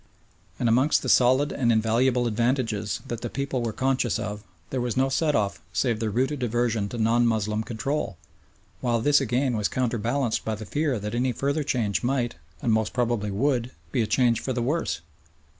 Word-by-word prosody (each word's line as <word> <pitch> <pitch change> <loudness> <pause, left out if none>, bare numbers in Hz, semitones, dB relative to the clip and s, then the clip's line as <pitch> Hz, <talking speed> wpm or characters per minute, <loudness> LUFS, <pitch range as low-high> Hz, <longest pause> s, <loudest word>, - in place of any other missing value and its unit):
And 120 - 0
against 130 +6 +3
the - - -2
solid 130 +4 +4
and 120 -4 +1
invaluable 120 +3 +2
advantages 115 -2 0
that 120 -2 -4
the 120 - -3
people 140 -1 -2
were 115 -1 -1
conscious 130 -1 0
of 105 0 -5 0.3
there 130 - -1
was 120 -2 -2
no 135 +1 +3
set 150 +3 +1
off 100 -6 0
save 120 -4 +1
their 110 -1 -1
rooted 130 +6 0
aversion 115 -3 0
to 120 - -6
non 115 +2 +3
Moslem 110 -1 0
control, 115 - -3 0.6
while 120 -2 +1
this 145 +5 +4
again 125 0 0
was 105 -2 +1
counterbalanced 120 0 -1
by 110 - -2
the 110 +1 -8
fear 145 - 0
that 105 +1 -5
any 125 +2 +1
further 140 +5 -1
change 115 -8 0
might, 125 -1 0 0.3
and 115 - +2
most 110 -1 0
probably 120 -4 0
would, 125 +3 0 0.2
be 125 - +1
a 110 - 0
change 120 +1 +3
for 130 - -3
the 120 -1 -1
worse. 150 - -1
120 Hz, 190 wpm, -26 LUFS, 110-130 Hz, 0.6 s, solid